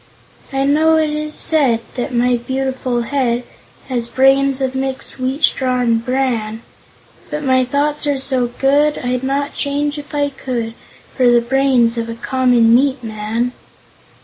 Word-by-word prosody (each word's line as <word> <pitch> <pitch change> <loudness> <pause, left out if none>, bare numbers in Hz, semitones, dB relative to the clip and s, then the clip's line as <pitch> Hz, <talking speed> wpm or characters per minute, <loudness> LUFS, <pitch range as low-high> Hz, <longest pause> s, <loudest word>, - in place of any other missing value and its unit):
"I 270 0 0
know 310 +3 +3
it 310 -1 +1
is 305 0 -3
said 270 -8 +2
That 255 +2 -4
my 245 0 +2
beautiful 260 -1 -2
head 245 -2 -1 0.4
Has 240 -3 -1
brains 270 +1 +3
of 265 -1 -1
mixed 265 0 -4
wheat 260 +4 -2
straw 255 -2 +2
and 230 -2 +1
bran, 235 -4 -2 0.7
But 300 0 -4
my 260 -1 +3
thoughts 290 +3 -1
are 285 -1 +1
so 260 -2 +1
good 285 +4 +1
I'd 250 0 -2
not 275 +2 -2
change, 290 +1 -2
if 295 0 -9
I 285 0 +1
could, 245 -4 -4 0.4
For 250 -2 +4
the 240 0 +5
brains 245 -1 +2
of 230 0 -4
a 230 - -5
common 245 -2 +2
meat 260 +1 +2
man. 220 +2 -2
260 Hz, 155 wpm, -17 LUFS, 240-280 Hz, 0.7 s, the